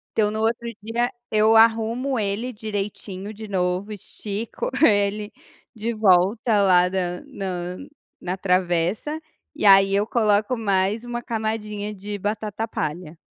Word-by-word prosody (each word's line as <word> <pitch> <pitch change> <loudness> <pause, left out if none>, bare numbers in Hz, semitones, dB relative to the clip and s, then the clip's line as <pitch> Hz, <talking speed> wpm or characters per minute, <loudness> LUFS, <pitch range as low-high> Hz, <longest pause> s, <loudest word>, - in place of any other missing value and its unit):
Então 210 -1 +3
no 215 +1 -3
outro 230 +1 0
dia 235 +3 -1 0.2
eu 215 +1 +4
arrumo 230 +4 +3
ele 215 +4 -2
direitinho 205 -2 -5
de 220 0 -9
novo, 185 +1 -1
estico 210 +1 -5
ele 205 -2 +2 0.4
de 230 +1 -3
volta 210 +2 +3
lá 180 -2 +5
da 180 -2 -2
na 180 -2 -5 0.4
na 180 +1 -3
travessa 185 - 0 0.4
e - - -3
aí 195 -1 +7
eu 205 +1 +2
coloco 215 0 +2
mais 200 -1 0
uma 240 0 -4
camadinha 215 -2 -3
de 205 +1 -6
batata 210 +2 -3
palha. 160 -3 -4
210 Hz, 130 wpm, -23 LUFS, 190-220 Hz, 0.4 s, aí